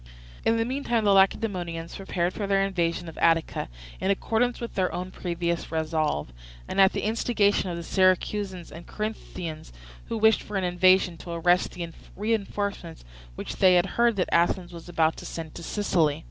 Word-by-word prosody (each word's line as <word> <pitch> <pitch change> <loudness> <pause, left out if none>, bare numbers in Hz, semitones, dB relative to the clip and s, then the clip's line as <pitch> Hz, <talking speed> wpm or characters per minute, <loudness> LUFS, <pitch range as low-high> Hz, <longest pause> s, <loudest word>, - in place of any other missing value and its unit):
In 225 - +3
the 225 - +1
meantime 240 -3 -1
the 200 -1 +4
Lacedaemonians 185 -4 +1
prepared 180 -2 -2
for 205 - -3
their 195 0 +3
invasion 175 -2 -1
of 165 - -9
Attica, 165 - +1 0.3
in 190 - -1
accordance 225 +5 +1
with 235 - -6
their 185 -2 0
own 180 +1 -5
previous 170 -2 -3
resolve, 155 - -1 0.3
and - - +2
at 190 - +6
the - - -2
instigation 210 -3 +1
of 170 - -4
the 170 - -5
Syracusans 185 0 +1
and 170 +1 -10
Corinthians, 180 -7 -5 0.3
who 230 - -3
wished 220 0 +4
for 205 - -5
an 190 - -1
invasion 180 0 +3
to 175 - -11
arrest 175 +2 +2
the 175 -1 -5 0.3
reinforcements 200 - -3 0.3
which - - -6
they 185 -2 +6
heard 235 +6 +2
that 185 - 0
Athens 175 +1 +2
was 170 +1 -10
about 160 -2 +1
to - - -9
send 160 -2 -6
to - - -8
Sicily. 165 -6 +1
185 Hz, 175 wpm, -26 LUFS, 170-205 Hz, 0.3 s, at